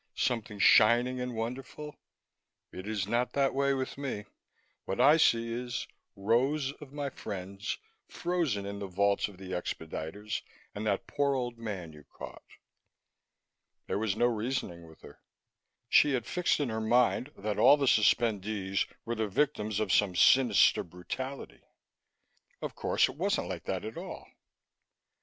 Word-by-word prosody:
Something 115 Hz, -3 st, -1 dB
shining 120 Hz, +5 st, +5 dB
and 125 Hz, -1 st, -4 dB
wonderful? 130 Hz, +6 st, -5 dB, 0.8 s
It 95 Hz, +2 st, -8 dB
is 105 Hz, -3 st, -1 dB
not 120 Hz, +3 st, 0 dB
that 140 Hz, -1 st, +2 dB
way 140 Hz, 0 st, +2 dB
with 130 Hz, +1 st, -4 dB
me; 125 Hz, -7 st, -4 dB, 0.6 s
what 95 Hz, -, -3 dB
I 150 Hz, +3 st, +7 dB
see 115 Hz, -6 st, +3 dB
is 120 Hz, 0 st, -4 dB, 0.3 s
rows 130 Hz, +8 st, +1 dB
of 140 Hz, -3 st, -10 dB
my 145 Hz, -1 st, -4 dB
friends, 100 Hz, +1 st, -5 dB, 0.3 s
frozen 165 Hz, -, -1 dB
in 100 Hz, 0 st, -5 dB
the 100 Hz, -, -4 dB
vaults 100 Hz, +3 st, +1 dB
or -, -, -13 dB
the 95 Hz, 0 st, -10 dB
expediters 90 Hz, +3 st, -4 dB, 0.3 s
and 105 Hz, +1 st, -4 dB
that 100 Hz, -2 st, 0 dB
poor 140 Hz, -1 st, 0 dB
old 120 Hz, -2 st, -3 dB
man 95 Hz, -8 st, -5 dB
you 75 Hz, -1 st, -14 dB
caught." -, -, -10 dB, 1.4 s
There -, -, -2 dB
was 105 Hz, -2 st, 0 dB
no 120 Hz, -, +2 dB
reasoning 110 Hz, -7 st, -2 dB
with 80 Hz, -, -17 dB
her. -, -, -14 dB, 0.7 s
She 145 Hz, -, +5 dB
had 120 Hz, -3 st, -1 dB
fixed 180 Hz, +3 st, +1 dB
in 145 Hz, -4 st, 0 dB
her 110 Hz, 0 st, -2 dB
mind 125 Hz, +4 st, +2 dB
that 105 Hz, 0 st, -3 dB
all 145 Hz, -, +7 dB
the 140 Hz, -, 0 dB
suspendees 105 Hz, -4 st, +2 dB, 0.2 s
were 115 Hz, -, -2 dB
the 110 Hz, -1 st, -1 dB
victims 105 Hz, -3 st, 0 dB
of 105 Hz, -3 st, 0 dB
some 100 Hz, -3 st, +3 dB
sinister 130 Hz, +6 st, +5 dB
brutality. 130 Hz, +11 st, -7 dB, 1.0 s
Of -, -, -5 dB
course, -, -, +2 dB
it -, -, -9 dB
wasn't -, -, 0 dB
like -, -, -6 dB
that -, -, -3 dB
at -, -, -7 dB
all. -, -, -8 dB
115 Hz, 150 wpm, -30 LUFS, 100-130 Hz, 1.4 s, I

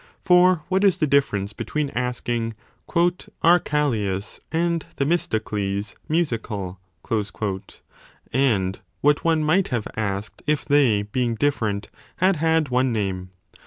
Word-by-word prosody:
For 180 Hz, -2 st, +4 dB
what 190 Hz, +2 st, +1 dB
is 195 Hz, -3 st, +4 dB
the 155 Hz, -, +2 dB
difference 110 Hz, -8 st, +1 dB
between 150 Hz, +6 st, -2 dB
asking 120 Hz, -2 st, -2 dB, 0.3 s
Are -, -, -17 dB, 0.2 s
176* 175 Hz, -1 st, +1 dB
Callias 110 Hz, -10 st, -1 dB
and 170 Hz, -1 st, 0 dB
Themistocles 105 Hz, -, -1 dB, 0.2 s
musical? 110 Hz, -, -1 dB, 1.5 s
and 105 Hz, -8 st, +1 dB, 0.2 s
what 145 Hz, 0 st, +3 dB
one 160 Hz, -2 st, +2 dB
might 175 Hz, +5 st, +3 dB
have 120 Hz, -5 st, -2 dB
asked 100 Hz, -1 st, -3 dB
if 150 Hz, -2 st, +1 dB
they, 135 Hz, -8 st, +3 dB
being 115 Hz, +3 st, -1 dB
different, 110 Hz, -6 st, 0 dB, 0.3 s
had 185 Hz, -1 st, +3 dB
had 160 Hz, -1 st, +2 dB
one 130 Hz, +1 st, +2 dB
name 95 Hz, -4 st, -2 dB
130 Hz, 120 wpm, -23 LUFS, 105-155 Hz, 1.5 s, For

